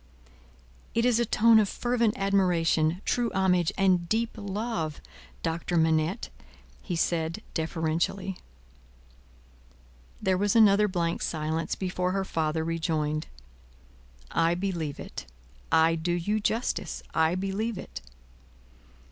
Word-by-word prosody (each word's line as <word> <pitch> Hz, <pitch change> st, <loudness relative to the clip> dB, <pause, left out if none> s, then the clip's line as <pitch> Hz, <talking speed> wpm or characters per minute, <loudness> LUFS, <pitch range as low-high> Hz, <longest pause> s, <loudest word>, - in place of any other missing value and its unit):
"It 230 Hz, +1 st, +2 dB
is 240 Hz, -2 st, +3 dB
a 235 Hz, -, +1 dB
tone 225 Hz, +1 st, +5 dB
of 205 Hz, -2 st, +2 dB
fervent 235 Hz, -3 st, 0 dB
admiration, 180 Hz, -3 st, +2 dB
true 240 Hz, -1 st, +1 dB
homage, 180 Hz, -3 st, +2 dB
and 185 Hz, -3 st, +2 dB
deep 230 Hz, +1 st, +1 dB
love, 200 Hz, -6 st, -3 dB, 0.4 s
Doctor 170 Hz, +1 st, -1 dB
Manette!" 160 Hz, +5 st, +1 dB, 0.5 s
he 180 Hz, -, -4 dB
said 165 Hz, 0 st, -1 dB
deferentially. 165 Hz, +4 st, -1 dB, 1.8 s
There 185 Hz, -1 st, +1 dB
was 205 Hz, +1 st, +1 dB
another 210 Hz, -2 st, +6 dB
blank 170 Hz, -3 st, -1 dB
silence 160 Hz, +1 st, -2 dB
before 180 Hz, -1 st, -2 dB
her 195 Hz, 0 st, -1 dB
father 160 Hz, -2 st, -1 dB
rejoined: 160 Hz, -2 st, -1 dB, 1.0 s
"I 165 Hz, +1 st, +2 dB
believe 175 Hz, -6 st, -3 dB
it. -, -, -8 dB, 0.4 s
I 160 Hz, 0 st, +5 dB
do 165 Hz, +1 st, -1 dB
you 205 Hz, +5 st, 0 dB
justice; 225 Hz, +3 st, -2 dB
I 160 Hz, +2 st, +2 dB
believe 195 Hz, +4 st, -2 dB
it." -, -, -8 dB
180 Hz, 115 wpm, -27 LUFS, 165-205 Hz, 1.8 s, another